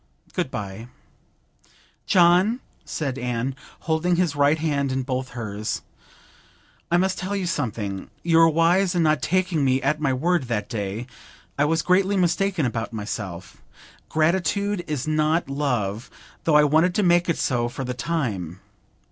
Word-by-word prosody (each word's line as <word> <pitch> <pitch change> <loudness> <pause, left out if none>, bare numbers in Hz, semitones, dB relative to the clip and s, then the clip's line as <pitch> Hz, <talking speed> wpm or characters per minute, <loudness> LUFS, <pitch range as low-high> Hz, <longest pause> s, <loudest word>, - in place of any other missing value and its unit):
Good 175 -7 -1
bye!' 105 0 -6 1.2
'John,' 185 +6 +4 0.3
said 135 -4 -3
Anne, 125 +1 -2 0.3
holding 165 +2 +1
his 170 -4 +1
right 145 +2 +3
hand 145 -4 0
in 130 0 -1
both 130 0 -3
hers, 105 -2 -4 1.1
'I 175 - +3
must 190 +1 +1
tell 195 +2 -3
you 195 -2 -1
something. 105 - -3
You 165 -1 +4
were 165 0 +7
wise 175 +4 +3
in 170 - +3
not 155 -4 +2
taking 175 -2 +1
me 130 -1 +3
at 150 - +1
my 140 -3 +2
word 165 +4 +1
that 105 -4 -2
day. 105 +1 -3 0.5
I 145 - +2
was 160 +1 +1
greatly 195 +2 +3
mistaken 180 -2 +1
about 115 -2 -2
myself. 105 -5 -6 0.5
Gratitude 185 +4 +1
is 150 -3 -3
not 155 +2 +1
love, 120 -6 -1 0.4
though 160 - +3
I 150 - +7
wanted 160 +5 +3
to 210 - +2
make 175 -1 +3
it 165 - +1
so 120 -2 0
for 130 - -5
the 125 0 -3
time. 120 - -3
150 Hz, 155 wpm, -24 LUFS, 125-175 Hz, 1.2 s, were